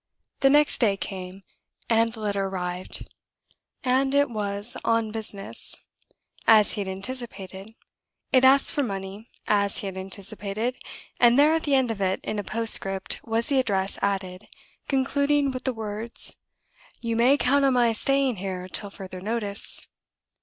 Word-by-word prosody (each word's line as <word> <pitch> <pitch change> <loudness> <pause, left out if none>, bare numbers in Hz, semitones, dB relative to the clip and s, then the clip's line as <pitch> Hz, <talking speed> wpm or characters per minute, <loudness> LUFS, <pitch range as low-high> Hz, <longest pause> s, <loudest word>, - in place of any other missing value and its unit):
The 270 - +5
next 295 +1 +4
day 205 -5 +3
came, 190 0 -7 0.4
and 230 0 +3
the 225 -1 -10
letter 200 -2 -1
arrived! 180 -1 -4 0.8
It 270 +2 +2
was 205 0 -3
on 230 -1 +1
business, 210 -3 -6 0.7
as 215 -2 +6
he 205 - -3
had 195 - -4
anticipated; 195 -1 -6 0.6
it 255 -1 +5
asked 270 +1 +7
for 290 - +1
money, 200 -2 -5 0.2
as 200 -1 +1
he - - -3
had 190 -1 -5
anticipated; 205 +4 -2 0.4
and 240 +1 +6
there, 295 +2 +6
at 325 - +1
the 285 -2 +3
end 260 -3 +2
of 205 -3 -5
it, 190 0 +1
in 215 - -3
a - - -3
postscript, 195 -3 +1
was 230 +1 0
the 275 -2 +2
address 195 -6 -1
added, 190 -1 -2 0.4
concluding 280 +1 +1
with 255 -1 -6
the 260 - +2
words, 220 +1 -3 0.7
"You 230 -1 -2
may 250 +5 +4
count 280 +1 +2
on 270 -1 +4
my 240 -2 +3
staying 275 +1 +1
here 185 -1 -5
till 200 +2 -3
further 185 -2 -9
notice." 210 -1 0
220 Hz, 155 wpm, -25 LUFS, 195-255 Hz, 0.8 s, asked